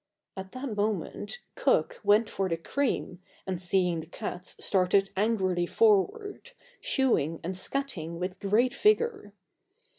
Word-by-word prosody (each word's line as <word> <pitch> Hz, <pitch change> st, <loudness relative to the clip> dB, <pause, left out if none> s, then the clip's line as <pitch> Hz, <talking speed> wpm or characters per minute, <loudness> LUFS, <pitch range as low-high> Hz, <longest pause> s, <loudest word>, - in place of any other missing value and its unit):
At 190 Hz, 0 st, -8 dB
that 255 Hz, -3 st, -5 dB
moment 215 Hz, -, -3 dB
Cook -, -, +1 dB
went 210 Hz, +2 st, +4 dB
for 195 Hz, -2 st, -2 dB
the 165 Hz, -, -1 dB
cream 225 Hz, -2 st, -2 dB, 0.2 s
and 185 Hz, -2 st, -3 dB
seeing 180 Hz, -2 st, +2 dB
the 160 Hz, -, -8 dB
cats 180 Hz, +1 st, -4 dB
started 195 Hz, +1 st, +3 dB
angrily 190 Hz, -4 st, +1 dB
forward, 405 Hz, -, +1 dB, 0.3 s
shoo 270 Hz, -, +2 dB
ing 160 Hz, +3 st, -4 dB
and 185 Hz, +3 st, -3 dB
scat 275 Hz, +9 st, 0 dB
ing 165 Hz, +2 st, -6 dB
with 180 Hz, +1 st, -5 dB
great 225 Hz, +5 st, +2 dB
vigour. 425 Hz, -, +1 dB
205 Hz, 140 wpm, -28 LUFS, 180-275 Hz, 0.3 s, went